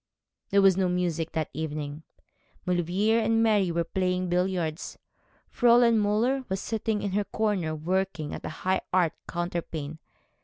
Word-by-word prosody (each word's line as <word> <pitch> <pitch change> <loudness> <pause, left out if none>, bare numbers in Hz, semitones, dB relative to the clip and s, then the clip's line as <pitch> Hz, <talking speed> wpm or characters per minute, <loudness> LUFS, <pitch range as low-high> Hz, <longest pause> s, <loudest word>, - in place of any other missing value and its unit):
There 200 0 +4
was 190 -2 +5
no 185 -2 +2
music 170 -2 -1
that 160 -1 -2
evening. 150 0 -4 0.6
Maulevrier 180 +6 +1
and 225 0 +2
Mary 205 -5 +3
were 170 0 0
playing 180 +1 -1
billiards; 175 -3 -1 0.6
Fräulein 235 -1 +5
Müller 230 +6 +1
was 190 0 -1
sitting 220 0 -2
in 200 - -1
her 205 +2 0
corner 195 -9 -1
working 170 -1 -2
at - - -7
a - - -4 0.2
high 190 0 +2
art 175 -3 +2
counterpane. 165 -3 -4
185 Hz, 145 wpm, -27 LUFS, 165-210 Hz, 0.6 s, was